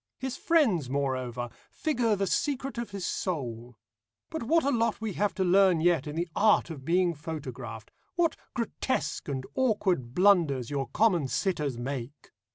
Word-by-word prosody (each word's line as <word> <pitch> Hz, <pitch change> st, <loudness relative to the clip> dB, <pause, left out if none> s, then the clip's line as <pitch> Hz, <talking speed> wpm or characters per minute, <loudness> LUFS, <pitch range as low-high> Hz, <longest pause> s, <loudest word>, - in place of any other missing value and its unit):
His 265 Hz, 0 st, -4 dB
friends, 225 Hz, -, +2 dB
moreover, 130 Hz, -3 st, -2 dB, 0.2 s
figure 245 Hz, -8 st, 0 dB
the 195 Hz, 0 st, 0 dB
secret 270 Hz, +3 st, -1 dB
of 235 Hz, -, -4 dB
his 200 Hz, -3 st, -5 dB
soul. 120 Hz, -, -3 dB, 0.5 s
But 320 Hz, -, -3 dB
what 320 Hz, +7 st, +3 dB
a 280 Hz, -, +2 dB
lot 230 Hz, -2 st, +1 dB
we 220 Hz, -2 st, -3 dB
have 205 Hz, 0 st, 0 dB
to 190 Hz, -, +1 dB
learn 185 Hz, -1 st, +5 dB
yet 165 Hz, -3 st, +2 dB
in 150 Hz, -, -5 dB
the 170 Hz, +2 st, -1 dB
art 210 Hz, -4 st, +4 dB
of 140 Hz, -5 st, -8 dB
being 175 Hz, +3 st, +2 dB
photographed, 135 Hz, -8 st, -7 dB, 0.2 s
what 345 Hz, -2 st, +2 dB, 0.2 s
grotesque 235 Hz, -, -2 dB
and 135 Hz, -2 st, -2 dB
awkward 195 Hz, -, +1 dB
blunders 165 Hz, -, +3 dB
your 135 Hz, -2 st, -1 dB
common 175 Hz, -4 st, +2 dB
sitters 150 Hz, -, -1 dB
make! 130 Hz, +2 st, -6 dB
175 Hz, 160 wpm, -29 LUFS, 135-220 Hz, 0.5 s, learn